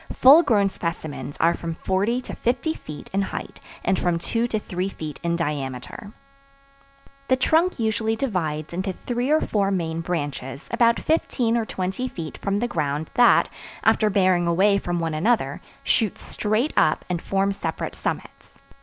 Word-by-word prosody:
Full 280 Hz, +6 st, +8 dB
grown 205 Hz, -, +2 dB
specimens 160 Hz, -5 st, -5 dB
are 170 Hz, +1 st, +3 dB
from 165 Hz, -1 st, -5 dB
forty 200 Hz, +9 st, 0 dB
to -, -, -8 dB
fifty 260 Hz, +7 st, 0 dB
feet 150 Hz, -, -10 dB
in 195 Hz, -, +2 dB
height 195 Hz, -, -5 dB, 0.3 s
and 190 Hz, -, +2 dB
from 175 Hz, -1 st, +1 dB
two 230 Hz, +7 st, -1 dB
to 225 Hz, -, -1 dB
three 185 Hz, -2 st, -3 dB
feet 155 Hz, -5 st, -7 dB
in 170 Hz, 0 st, 0 dB
diameter. 145 Hz, +3 st, -4 dB, 1.2 s
The 260 Hz, -, +4 dB
trunk 320 Hz, +7 st, +2 dB
usually 220 Hz, -1 st, 0 dB
divides 165 Hz, -, -2 dB
into 190 Hz, +2 st, -2 dB
three 245 Hz, +6 st, -3 dB
or 310 Hz, +1 st, +5 dB
four 200 Hz, -2 st, +1 dB
main 165 Hz, -4 st, -1 dB
branches 145 Hz, -5 st, -4 dB
about 235 Hz, 0 st, +3 dB
fifteen 245 Hz, -7 st, +1 dB
or 230 Hz, -2 st, +1 dB
twenty 190 Hz, +7 st, -2 dB
feet 165 Hz, -10 st, -6 dB
from 200 Hz, 0 st, -1 dB
the 240 Hz, +3 st, 0 dB
ground 150 Hz, -6 st, -2 dB
that, 245 Hz, -1 st, +5 dB, 0.4 s
after 215 Hz, -, +4 dB
bearing 185 Hz, -3 st, +3 dB
away 200 Hz, +4 st, +4 dB
from 175 Hz, -2 st, -2 dB
one 165 Hz, -1 st, -1 dB
another, 220 Hz, +10 st, +1 dB, 0.2 s
shoot 220 Hz, -5 st, +1 dB
straight 215 Hz, +7 st, -1 dB
up 155 Hz, -, +3 dB
and 175 Hz, -2 st, -2 dB
form 195 Hz, 0 st, +1 dB
separate 195 Hz, -, -4 dB
summits. -, -, -5 dB
195 Hz, 165 wpm, -24 LUFS, 165-230 Hz, 1.2 s, Full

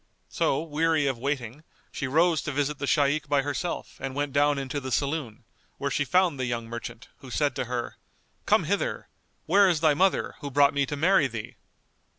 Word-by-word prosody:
So 135 Hz, -, 0 dB
weary 160 Hz, -1 st, +1 dB
of 135 Hz, -4 st, -1 dB
waiting, 135 Hz, 0 st, -3 dB, 0.3 s
she 135 Hz, -, -3 dB
rose 160 Hz, +4 st, +3 dB
to 155 Hz, -, -4 dB
visit 145 Hz, +1 st, -1 dB
the 140 Hz, -, -3 dB
Shaykh 145 Hz, 0 st, +1 dB
by 145 Hz, -2 st, +2 dB
herself 145 Hz, +5 st, -4 dB
and 135 Hz, 0 st, -5 dB
went 145 Hz, -1 st, -2 dB
down 145 Hz, 0 st, +3 dB
into 135 Hz, +1 st, -3 dB
the 130 Hz, -1 st, -6 dB
saloon, 140 Hz, -5 st, -2 dB, 0.3 s
where 140 Hz, 0 st, -2 dB
she 145 Hz, -, 0 dB
found 180 Hz, -2 st, +2 dB
the 130 Hz, -, -1 dB
young 120 Hz, -1 st, -3 dB
merchant, 115 Hz, +1 st, -8 dB
who 130 Hz, -, -12 dB
said 140 Hz, +1 st, 0 dB
to -, -, -1 dB
her, 120 Hz, 0 st, -4 dB, 0.5 s
"Come -, -, +4 dB
hither! -, -, -2 dB, 0.4 s
where 195 Hz, +3 st, +5 dB
is 170 Hz, -3 st, +1 dB
thy 155 Hz, -2 st, +5 dB
mother, 190 Hz, +6 st, +1 dB
who 145 Hz, -, -5 dB
brought 140 Hz, +1 st, +4 dB
me 140 Hz, -1 st, +1 dB
to 145 Hz, -, -3 dB
marry 160 Hz, 0 st, +3 dB
thee?" 115 Hz, -4 st, -7 dB
140 Hz, 195 wpm, -26 LUFS, 130-155 Hz, 0.5 s, where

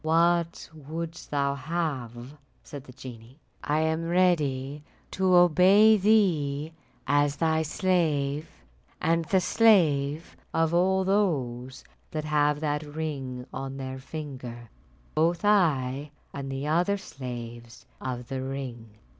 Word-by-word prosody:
"What 170 Hz, +1 st, +2 dB
wouldst 160 Hz, +3 st, -7 dB
thou 140 Hz, -1 st, 0 dB
have?" 140 Hz, -5 st, -4 dB, 0.3 s
said 145 Hz, -2 st, -9 dB
the 130 Hz, -, -12 dB
genie, 125 Hz, -1 st, -11 dB, 0.3 s
"I 150 Hz, +1 st, +1 dB
am 160 Hz, +1 st, 0 dB
ready 150 Hz, -6 st, +1 dB, 0.3 s
to 190 Hz, -1 st, +2 dB
obey 185 Hz, +5 st, +6 dB
thee 165 Hz, -8 st, +2 dB, 0.3 s
as 145 Hz, +1 st, +2 dB
thy 160 Hz, +1 st, +1 dB
slave, 155 Hz, -3 st, 0 dB, 0.5 s
and 165 Hz, 0 st, +1 dB
the 190 Hz, +4 st, +2 dB
slave 165 Hz, -8 st, +3 dB, 0.2 s
of 165 Hz, 0 st, +2 dB
all 190 Hz, +2 st, +3 dB
those 135 Hz, -11 st, -1 dB, 0.3 s
that 155 Hz, -1 st, -4 dB
have 150 Hz, -1 st, +1 dB
that 150 Hz, -1 st, -1 dB
ring 145 Hz, -5 st, -5 dB
on 135 Hz, +1 st, -5 dB
their 130 Hz, -1 st, -6 dB
finger; 130 Hz, -5 st, -8 dB, 0.4 s
both 170 Hz, +5 st, +1 dB
I 145 Hz, -9 st, +2 dB, 0.2 s
and 135 Hz, -1 st, -5 dB
the 135 Hz, +1 st, -4 dB
other 175 Hz, +6 st, +1 dB
slaves 120 Hz, -8 st, -8 dB, 0.2 s
of 125 Hz, -2 st, -5 dB
the 130 Hz, +1 st, -4 dB
ring." 125 Hz, -5 st, -6 dB
150 Hz, 120 wpm, -27 LUFS, 135-170 Hz, 0.5 s, obey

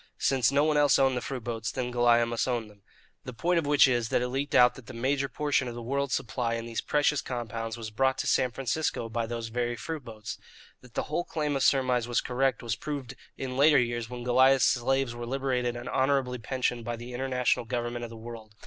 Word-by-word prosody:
Since 130 Hz, -3 st, +2 dB
no 140 Hz, +1 st, +3 dB
one 155 Hz, -1 st, +2 dB
else 145 Hz, -1 st, +5 dB
owned 135 Hz, -1 st, +3 dB
the 125 Hz, -, -2 dB
fruit 130 Hz, -1 st, -5 dB
boats, 115 Hz, -2 st, -3 dB
then 125 Hz, -1 st, -3 dB
Goliah 120 Hz, -1 st, +4 dB
must 115 Hz, +1 st, -1 dB
own 120 Hz, -3 st, -1 dB
them. 105 Hz, -1 st, -20 dB, 0.4 s
The 125 Hz, -, -7 dB
point 175 Hz, +6 st, +2 dB
of 155 Hz, -, -3 dB
which 145 Hz, -1 st, +6 dB
is: 120 Hz, -3 st, 0 dB
_that -, -, +2 dB
it 125 Hz, -, -1 dB
leaked 135 Hz, +3 st, -2 dB
out 125 Hz, 0 st, +7 dB
that 125 Hz, -3 st, -14 dB
the -, -, -9 dB
major 135 Hz, +3 st, 0 dB
portion 145 Hz, -3 st, 0 dB
of 120 Hz, -, -6 dB
the 120 Hz, -, -6 dB
world's 140 Hz, +2 st, -1 dB
supply 115 Hz, 0 st, -2 dB
in 115 Hz, 0 st, -4 dB
these 115 Hz, -1 st, -3 dB
precious 150 Hz, -1 st, +1 dB
compounds 115 Hz, -2 st, -4 dB
was 110 Hz, -2 st, -6 dB
brought 130 Hz, +4 st, +1 dB
to -, -, -2 dB
San 130 Hz, -, +2 dB
Francisco 135 Hz, -1 st, -2 dB
by 115 Hz, 0 st, -2 dB
those 115 Hz, -1 st, -4 dB
very 120 Hz, +1 st, -1 dB
fruit 155 Hz, +4 st, -5 dB
boats_. 110 Hz, -2 st, -8 dB, 0.4 s
That 125 Hz, -2 st, -18 dB
the -, -, 0 dB
whole 175 Hz, +4 st, -3 dB
chain 150 Hz, -2 st, -1 dB
of 135 Hz, -, -1 dB
surmise 130 Hz, -3 st, +2 dB
was 120 Hz, -, +1 dB
correct 130 Hz, -1 st, 0 dB
was 115 Hz, -2 st, -1 dB
proved 135 Hz, -1 st, -5 dB, 0.2 s
in 130 Hz, -1 st, -4 dB
later 145 Hz, +1 st, +6 dB
years 120 Hz, -2 st, 0 dB
when 125 Hz, -1 st, -6 dB
Goliah's 130 Hz, +2 st, +5 dB
slaves 135 Hz, 0 st, +2 dB
were 120 Hz, 0 st, -6 dB
liberated 125 Hz, -2 st, -1 dB
and 120 Hz, +1 st, -7 dB
honourably 130 Hz, -1 st, +1 dB
pensioned 120 Hz, 0 st, -2 dB
by 120 Hz, +1 st, -3 dB
the 120 Hz, +2 st, -9 dB
international 125 Hz, -1 st, 0 dB
government 120 Hz, 0 st, -3 dB
of 120 Hz, -, -5 dB
the 115 Hz, -, -10 dB
world. 110 Hz, -2 st, -10 dB
125 Hz, 230 wpm, -28 LUFS, 120-135 Hz, 0.4 s, out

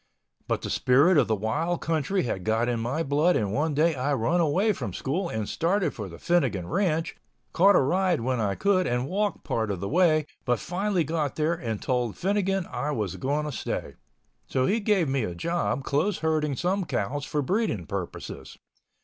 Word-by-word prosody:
But -, -, -1 dB
the -, -, -3 dB
spirit 140 Hz, +9 st, +4 dB
of -, -, +2 dB
the 110 Hz, -, +2 dB
wild 150 Hz, -, -1 dB
country 165 Hz, +4 st, 0 dB
had 95 Hz, -7 st, -3 dB
got 110 Hz, +3 st, +1 dB
in 120 Hz, -1 st, 0 dB
my 130 Hz, +8 st, -1 dB
blood 155 Hz, +5 st, +2 dB
and 105 Hz, -6 st, 0 dB
one 150 Hz, +3 st, 0 dB
day 160 Hz, +3 st, +3 dB
I 140 Hz, +1 st, 0 dB
run 165 Hz, +9 st, +1 dB
away 185 Hz, +8 st, +2 dB
from -, -, -5 dB
school 170 Hz, +7 st, -2 dB
and 110 Hz, -2 st, -3 dB
started 180 Hz, +4 st, 0 dB
for 105 Hz, -4 st, -6 dB
the 85 Hz, -, -10 dB
Finnegan 130 Hz, -, +1 dB
Ranch, 165 Hz, -, 0 dB, 0.4 s
caught 195 Hz, +3 st, +5 dB
a -, -, +6 dB
ride 180 Hz, +3 st, +1 dB
when 125 Hz, +1 st, -1 dB
I 100 Hz, -3 st, 0 dB
could 200 Hz, -2 st, +2 dB
and 125 Hz, +1 st, 0 dB
walked 205 Hz, +3 st, -1 dB
part 110 Hz, -2 st, -1 dB
of 100 Hz, -3 st, -2 dB
the 100 Hz, -, -3 dB
way, 155 Hz, -, +3 dB, 0.2 s
but 120 Hz, -2 st, +1 dB
finally 185 Hz, 0 st, 0 dB
got 155 Hz, -2 st, -2 dB
there, 155 Hz, +2 st, +1 dB
and 115 Hz, -11 st, -4 dB
told 125 Hz, -4 st, -1 dB
Finnegan 195 Hz, -1 st, 0 dB
I 150 Hz, -, -2 dB
was 105 Hz, -, -2 dB
going 145 Hz, +8 st, -1 dB
to 150 Hz, -, -3 dB
stay. 90 Hz, -, -4 dB, 0.5 s
So 130 Hz, -1 st, +1 dB
he 215 Hz, +9 st, +2 dB
gave 205 Hz, -6 st, +2 dB
me 135 Hz, -2 st, 0 dB
a 90 Hz, -5 st, -4 dB
job 170 Hz, -, -1 dB
close 160 Hz, +9 st, 0 dB
herding 155 Hz, -3 st, +1 dB
some 185 Hz, +6 st, 0 dB
cows 145 Hz, -, -2 dB
for 150 Hz, 0 st, -1 dB
breeding 185 Hz, -, 0 dB
purposes. 100 Hz, -4 st, -6 dB
150 Hz, 200 wpm, -26 LUFS, 120-175 Hz, 0.5 s, a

